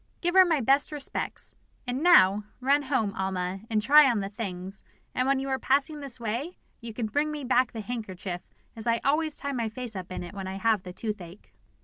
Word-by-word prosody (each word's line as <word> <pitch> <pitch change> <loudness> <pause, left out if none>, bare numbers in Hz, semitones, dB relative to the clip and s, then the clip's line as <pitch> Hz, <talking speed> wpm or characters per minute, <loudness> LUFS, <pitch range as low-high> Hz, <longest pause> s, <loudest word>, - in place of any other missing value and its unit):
Give 350 0 -1
her 375 0 +8
my 320 -5 +1
best 275 +5 +2
respects. 295 -2 -4 0.3
And 250 +2 -3
now, 210 - +6
run 275 +3 +3
home, 260 -8 -1
Alma, 190 -1 -2
and 215 -2 +1
try 290 +4 +7
on 235 -4 +1
the 195 0 -3
things, 195 -2 -6 0.3
and 255 - 0
when 275 0 +3
you 270 - -4
are 265 0 0
passing 285 +4 +2
this 275 -3 -7
way, 235 +10 -4 0.2
you 235 -1 -7
can 225 +1 -3
bring 290 +8 0
me 300 -1 -5
back 255 0 +2
the 225 - -6
handkerchief, 195 -6 -5 0.3
as 225 0 -6
I 230 0 +2
always 310 +2 +1
tie 280 - -3
my 235 -4 -2
face 235 0 -6
up 185 -1 -7
in 185 - -4
it 175 - -9
when 195 -1 -6
I 190 - -5
have 215 0 +1
the 180 - -9
toothache." 195 -2 -6
235 Hz, 220 wpm, -27 LUFS, 200-275 Hz, 0.3 s, her